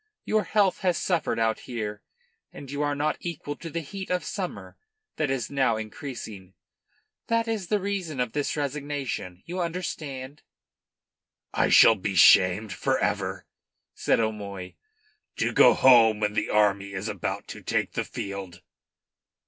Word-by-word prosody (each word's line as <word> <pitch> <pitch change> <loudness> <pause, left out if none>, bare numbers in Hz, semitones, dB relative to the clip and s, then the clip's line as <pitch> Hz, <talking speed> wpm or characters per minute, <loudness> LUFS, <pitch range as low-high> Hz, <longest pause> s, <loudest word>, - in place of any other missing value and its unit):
Your 215 -2 +1
health 200 -3 +2
has 180 -3 +1
suffered 175 -4 0
out 110 -1 +1
here, 105 -3 -4 0.5
and 140 -1 -10
you 145 +1 -3
are 145 -1 0
not 150 +2 0
equal 150 -4 -5
to 165 - -7
the 165 +2 -3
heat 190 +5 -7
of 180 -2 0
summer 185 +2 -5 0.4
that 155 -3 0
is 135 -3 -2
now 130 -5 +2
increasing. 110 - -8 0.7
That 230 0 +1
is 215 -5 -2
the 210 +2 +1
reason 190 -7 -3
of 125 -3 0
this 145 +2 -2
resignation. 140 -10 -4
You 180 +2 -4
understand?" 150 -5 -5 1.1
"I - - +2
shall - - +8
be 100 -1 -4
shamed 95 +4 +6
for 135 -1 0
ever," 95 -3 -2 0.5
said - - +1
O'Moy. 100 -4 -3 0.6
"To - - 0
go - - +7
home 115 -5 +6
when 105 -1 0
the - - -1
army 100 -2 +2
is 95 +3 -4
about 100 -5 -4
to - - -8
take - - -1
the - - -2
field!" 95 -3 -7
130 Hz, 150 wpm, -26 LUFS, 105-165 Hz, 1.1 s, shall